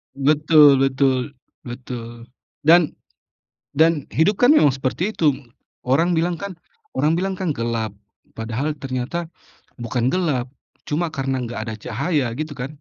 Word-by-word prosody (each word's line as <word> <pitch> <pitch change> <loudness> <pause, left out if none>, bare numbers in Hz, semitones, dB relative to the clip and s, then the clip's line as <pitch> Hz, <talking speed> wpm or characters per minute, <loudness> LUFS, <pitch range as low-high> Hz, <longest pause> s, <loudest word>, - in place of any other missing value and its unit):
Betul 150 0 +5
betul, 135 0 +1 0.3
betul. 120 -1 -8 0.3
Dan 165 +1 +5 0.8
dan 160 -2 +3
hidup 190 +6 +1
kan 245 - +7
memang 150 - +5
seperti 165 +10 -2
itu. 155 -3 +3 0.6
Orang 165 +7 +2
bilang 170 +2 +1
kan 200 -3 -6 0.4
orang 155 +2 +2
bilang 190 +3 -1
kan 175 -6 -1
gelap. 115 -3 -2 0.4
Padahal 120 +7 -3
ternyata, 135 +6 -3 0.5
bukan 120 +1 -1
gelap, 140 -8 -1 0.4
cuma 165 +3 0
karena 135 -2 -2
enggak 115 -1 -5
ada 110 - -4
cahaya, 120 - -1
gitu 155 -1 -4
kan. 135 +4 -6
140 Hz, 130 wpm, -21 LUFS, 125-165 Hz, 0.8 s, kan